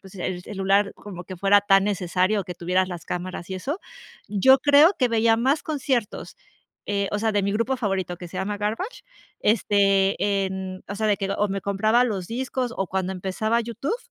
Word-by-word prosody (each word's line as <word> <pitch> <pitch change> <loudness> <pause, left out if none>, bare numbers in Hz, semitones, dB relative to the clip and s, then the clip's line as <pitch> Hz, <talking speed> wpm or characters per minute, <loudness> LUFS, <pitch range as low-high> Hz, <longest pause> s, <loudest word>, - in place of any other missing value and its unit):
pues, 190 0 -15
el 180 -1 -4
celular 200 0 +1
como 180 -4 -9
que 185 0 -8
fuera 200 +2 +4
tan 195 -1 +4
necesario 190 +1 0
o - - -6
que 180 -1 -7
tuvieras 185 +2 0
las 175 -3 -7
cámaras 180 0 -5
y 190 - -3
eso, 290 - -4 0.5
yo 265 +7 +5
creo 290 +7 +6
que 250 - +2
veía 225 0 +3
más 270 +6 +1
conciertos, 265 - -2 0.5
eh, 200 -1 -1
o 210 - -1
sea, 220 0 0
de 205 -1 +1
mi 200 - 0
grupo 230 +6 0
favorito, 190 -6 -2
que 175 -1 -9
se 185 - -9
llama 205 +1 -3
Garbage, 225 - -3 0.4
este, 200 -1 +2
en, 190 -1 -6
o 200 - -5
sea, 215 +1 -1
de 205 - +3
que, 195 - -3
o 210 0 +1
me 195 0 -3
compraba 215 +5 +2
los 195 -7 -3
discos 250 0 -3
o 195 - -1
cuando 190 0 -2
empezaba 205 +5 -1
YouTube, 235 - -3
200 Hz, 200 wpm, -24 LUFS, 190-230 Hz, 0.5 s, creo